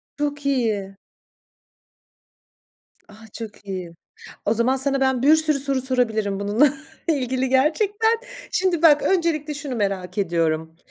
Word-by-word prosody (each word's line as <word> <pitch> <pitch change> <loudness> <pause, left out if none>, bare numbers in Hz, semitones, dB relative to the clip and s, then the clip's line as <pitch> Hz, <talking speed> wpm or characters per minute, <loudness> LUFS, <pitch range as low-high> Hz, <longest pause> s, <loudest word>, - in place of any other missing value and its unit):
Çok 290 -1 -3
iyi. 215 -8 -1 2.1
A - - -15 0.2
çok 220 -3 -9
iyi. 185 -3 -5 0.6
O 215 - +2
zaman, 245 +4 +2
sana 275 +1 +1
ben 265 -2 +1
bir 300 +3 +6
sürü 310 -2 +2
soru 275 -2 +2
sorabilirim 220 -6 0
bununla 235 +8 +3 0.3
ilgili 260 -4 0
gerçekten. 405 - +2 0.4
Şimdi 360 -3 0
bak, 295 -3 +6
öncelikle 320 -5 0
şunu 280 -4 -5
merak 195 -2 -2
ediyorum. 160 -3 -1
260 Hz, 120 wpm, -22 LUFS, 205-295 Hz, 2.1 s, bir